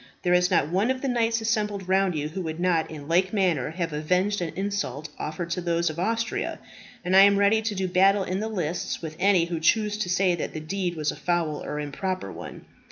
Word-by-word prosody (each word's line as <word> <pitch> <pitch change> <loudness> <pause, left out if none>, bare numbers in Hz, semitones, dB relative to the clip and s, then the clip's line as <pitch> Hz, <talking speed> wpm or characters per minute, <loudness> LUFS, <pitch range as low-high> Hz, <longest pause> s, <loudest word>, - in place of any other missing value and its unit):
There 180 -1 +2
is 180 0 +4
not 165 -5 +2
one 195 +6 +1
of 260 +1 -1
the - - 0
knights 230 -2 +1
assembled 210 -4 -1
round 190 -1 +2
you 150 0 -2
who 185 +5 -5
would 160 -1 -5
not 175 -3 +1
in 150 -2 -9
like 180 +3 +2
manner 180 - +1
have 165 0 -3
avenged 180 +7 0
an 165 -2 -2
insult 195 -6 -3
offered 165 +3 -4
to 180 - -1
those 170 -1 0
of 155 - -8
Austria; 225 +5 -1 0.5
and 185 +1 +2
I 195 - +9
am 200 0 +6
ready 200 +2 +4
to 220 -1 -2
do 190 -1 -1
battle 195 +2 +4
in 185 +1 -2
the 220 - -2
lists 175 -6 -3
with 155 -1 -5
any 190 -3 +4
who 170 -1 -3
choose 210 +5 +2
to 185 - -2
say 180 0 +2
that 170 - -4
the - - -2
deed 175 +2 -3
was 155 -1 -1
a - - -8
foul 170 -4 -1
or 150 - -4
improper 150 - -3
one. - - -9
180 Hz, 230 wpm, -25 LUFS, 165-200 Hz, 0.5 s, I